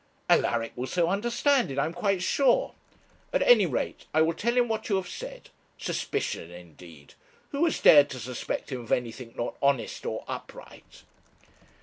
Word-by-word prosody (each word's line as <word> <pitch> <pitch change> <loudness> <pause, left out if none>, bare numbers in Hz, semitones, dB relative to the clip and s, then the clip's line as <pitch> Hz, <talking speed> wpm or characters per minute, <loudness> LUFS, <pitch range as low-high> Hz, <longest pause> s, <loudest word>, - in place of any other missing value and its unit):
'Alaric 115 -1 +2
will 125 +1 -4
so 170 +1 +1
understand 240 - +1
it, 135 - -6
I 140 - +2
am 165 - -4
quite 185 +1 0
sure; 265 +4 +2 0.6
at - - +2
any - - +6
rate - - -3
I 155 - +5
will 165 +1 +1
tell 235 +8 -1
him 245 -1 +4
what 220 0 -3
you 200 - +2
have 190 -2 -2
said. - - -9 0.3
Suspicion 85 - -3
indeed! 85 -4 -14 0.4
who 285 +3 0
has 330 - 0
dared 145 -1 +7
to 130 - -7
suspect 125 +3 -5
him 130 -2 -4
of 115 - -11
anything 120 0 -2
not 120 - -3
honest 140 -3 0
or - - -4
upright?' - - -10
160 Hz, 170 wpm, -27 LUFS, -, 0.6 s, dared